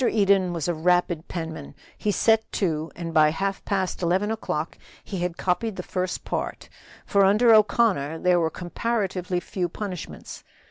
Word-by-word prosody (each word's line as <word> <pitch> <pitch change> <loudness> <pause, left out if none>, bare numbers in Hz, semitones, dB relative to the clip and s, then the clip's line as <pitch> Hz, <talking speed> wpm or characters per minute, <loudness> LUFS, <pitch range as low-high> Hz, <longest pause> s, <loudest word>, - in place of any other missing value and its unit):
Eden 200 -5 +3
was 170 -3 -2
a 175 - +1
rapid 175 0 +1
penman; 160 -4 -6 0.2
he 210 - -2
set 220 +2 +2
to, 160 -4 -1
and 165 -1 -5
by 155 -1 +6
half 195 +5 -2
past 190 -3 -1
eleven 185 +5 +1
o'clock 170 -7 -3 0.3
he 195 - -5
had 175 -1 -2
copied 190 +4 -1
the 180 - -5
first 185 0 -3
part; - - -4 0.4
for 200 -1 +3
under 215 +4 +5
O'Connor 210 -8 +3
there 180 +1 +3
were 165 -1 +1
comparatively 185 0 -2
few 175 0 -3
punishments. 185 -1 -7
180 Hz, 155 wpm, -25 LUFS, 170-200 Hz, 0.4 s, by